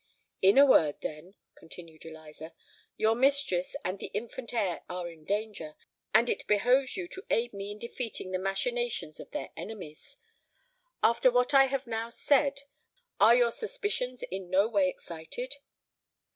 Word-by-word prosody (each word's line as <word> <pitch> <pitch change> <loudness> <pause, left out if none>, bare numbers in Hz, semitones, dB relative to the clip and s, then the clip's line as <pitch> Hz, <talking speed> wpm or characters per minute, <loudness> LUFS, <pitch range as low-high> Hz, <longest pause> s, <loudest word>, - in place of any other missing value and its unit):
"In 195 +6 +5
a 280 - +9
word, 155 - +4
then," 155 +6 -7 0.2
continued 160 -1 -14
Eliza, 160 0 -11 0.4
"your 220 +1 +3
mistress 265 -8 +2
and 185 +2 -2
the - - -6
infant 235 +2 -5
heir 195 -9 -1
are 180 -1 -4
in 165 -2 -13
danger; 205 -6 -3 0.4
and 235 - +5
it - - -2
behoves 250 - +2
you 360 -2 -4
to 380 - -7
aid 235 0 +1
me 200 0 -6
in 205 - -7
defeating 230 -4 -5
the 185 - -1
machinations 480 - -2
of - - -10
their - - -5
enemies. 215 - -8 0.9
After 235 +2 +5
what 245 +3 +2
I 270 -1 +7
have 270 0 -2
now 230 0 -3
said, 275 +3 +2 0.6
are 235 - +7
your 240 -1 +4
suspicions 410 - -3
in 190 -1 -6
no 195 +3 +3
way 200 -5 +2
excited?" 185 - -7
225 Hz, 155 wpm, -29 LUFS, 185-260 Hz, 0.9 s, a